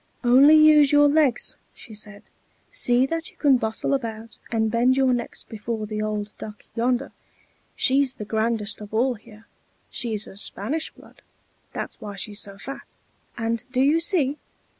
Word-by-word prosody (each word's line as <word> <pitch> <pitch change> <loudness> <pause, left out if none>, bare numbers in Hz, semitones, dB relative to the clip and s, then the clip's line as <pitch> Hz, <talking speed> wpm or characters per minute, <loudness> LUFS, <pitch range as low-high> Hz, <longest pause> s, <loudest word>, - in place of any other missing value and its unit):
"Only 265 +5 +7
use 305 -2 +7
your 290 0 +6
legs," 290 -4 +2 0.2
she 220 - -12
said. 210 -1 -7 0.5
"See 250 - +2
that 330 +3 -3
you - - -25
can 280 -3 +4
bustle 220 +3 -1
about, 230 -4 -4
and 220 -1 +1
bend 245 +3 +3
your 265 -2 +3
necks 245 - -4
before 220 0 -5
the 215 0 -4
old 210 -1 -3
Duck 210 -1 -9
yonder. 245 +3 0 0.6
She's 270 0 +2
the 210 - -7
grandest 220 -1 -1
of 210 +1 -8
all 250 +3 +2
here; 220 -1 -16 0.5
she's 220 -3 -2
of 195 - -11
Spanish 280 +12 -2
blood - - -19 0.5
that's - - -6
why 205 -1 -7
she's 205 +1 -5
so 200 -2 -8
fat; 270 +7 -9 0.4
and 230 0 -2
do 255 0 +1
you 295 +4 +4
see? 310 -5 +1
235 Hz, 160 wpm, -24 LUFS, 215-275 Hz, 0.6 s, Only